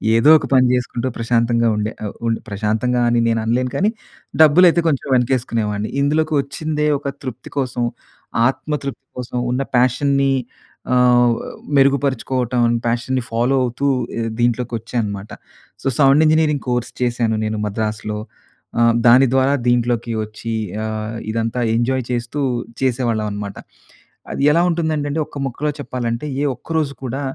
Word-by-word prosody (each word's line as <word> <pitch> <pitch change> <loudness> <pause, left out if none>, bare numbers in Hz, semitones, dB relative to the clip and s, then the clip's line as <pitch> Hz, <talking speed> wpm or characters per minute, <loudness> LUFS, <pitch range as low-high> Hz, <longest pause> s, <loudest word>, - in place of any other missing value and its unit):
ఏదో 115 +7 +5
ఒక - - -4
పని 130 -1 +5
చేసుకుంటూ 125 0 -1
ప్రశాంతంగా 115 0 +1
ఉండే. 105 +1 -1
ఆహ్, 100 - -5
ఉం 115 - +2 0.2
ప్రశాంతంగా 110 +4 0
అని 120 0 +2
నేను 115 -1 +1
అనలేను 125 +2 0
కానీ, 205 +3 +2 0.5
డబ్బులైతే 170 +3 +6
కొంచెం 140 -3 0
వెనకేసుకునేవాడిని. 115 -4 0
ఇందులోకి 155 +2 +1
వచ్చిందే 150 +2 -2
ఒక 145 - -6 0.2
తృప్తి 130 -1 -7
కోసం, 125 -2 -1 0.6
ఆత్మ 150 +3 -2
తృప్తి 140 - -6
కోసం 125 0 -5
ఉన్న 130 +2 0 0.2
పాషన్‌ని 135 +2 +2 0.6
ఆహ్, 125 -1 +5 0.4
మెరుగుపరుచుకోవటం, 130 -3 +1 0.2
పాషన్‌ని 120 +2 0
ఫాలో 120 +4 +1
అవుతూ 125 +3 -1 0.3
ఇ - - -1 0.2
దీంట్లోకొచ్చా 120 -1 -1
అన్నమాట. 100 -1 -5 0.5
సో, - - -3
సౌండ్ 140 +1 +5
ఇంజినీరింగ్ 155 -2 +2
కోర్స్ 120 -1 -1
చేశాను 120 -2 +1
నేను 110 0 -2
మద్రాసులో. 105 0 -3 0.6
ఆహ్, 115 0 +5
దాని 125 +3 +7
ద్వారా 135 +1 +3
దీంట్లోకి 120 -1 +1
వచ్చి 110 +2 -6 0.3
ఆహ్, 110 +1 -4
ఇదంతా 115 +2 -1
ఎంజాయ్ 130 +2 0
చేస్తూ 120 +4 -2 0.4
చేసేవాళ్ళం 120 -4 0
అన్నమాట. 100 -1 -5 0.8
అది - - -2
ఎలా 170 - +4
ఉంటుందంటేండి 155 -2 -1
ఒక్క - - -11
ముక్కలో 145 +4 -2
చెప్పాలంటే, 120 0 -3 0.2
ఏ - - +1
ఒక్క - - -21
రోజు 145 -3 0
కూడా, 130 +2 -3
125 Hz, 135 wpm, -19 LUFS, 115-140 Hz, 0.8 s, దాని